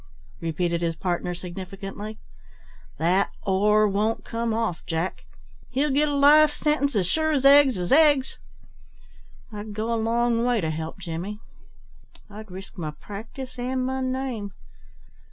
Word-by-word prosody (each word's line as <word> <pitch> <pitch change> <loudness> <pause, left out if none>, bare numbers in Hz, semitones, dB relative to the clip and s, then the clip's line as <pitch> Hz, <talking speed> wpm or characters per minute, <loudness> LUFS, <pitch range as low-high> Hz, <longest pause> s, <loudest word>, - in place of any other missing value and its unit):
repeated 170 +1 -1
his 165 -1 -1
partner 175 0 -2
significantly. 195 +4 -7 0.8
"That 180 +4 +2
'or' 210 +2 +3
won't 210 +3 0
come 230 0 -2
off, 220 -6 -1
Jack. 165 +2 -3 0.4
He'll 280 +3 0
get 295 +3 +3
a 290 - -1
life 295 +2 +6
sentence 295 -3 0
as 195 -3 +2
sure 315 - +1
as 275 -2 0
'eggs 275 -4 +7
is 180 -1 -3
eggs.' 285 -2 +4 1.1
I'd 210 0 -7
go 220 +2 -1
a 225 - 0
long 235 0 +1
way 245 -1 +2
to 160 -4 -1
help 160 +1 -5
Jimmy; 185 +3 -5 0.9
I'd 215 +1 -10
risk 190 +1 -10
my 155 -2 -3
practice 225 - -9
and 255 +1 -1
my 265 0 -2
name." 255 -6 -3
215 Hz, 140 wpm, -25 LUFS, 185-260 Hz, 1.1 s, eggs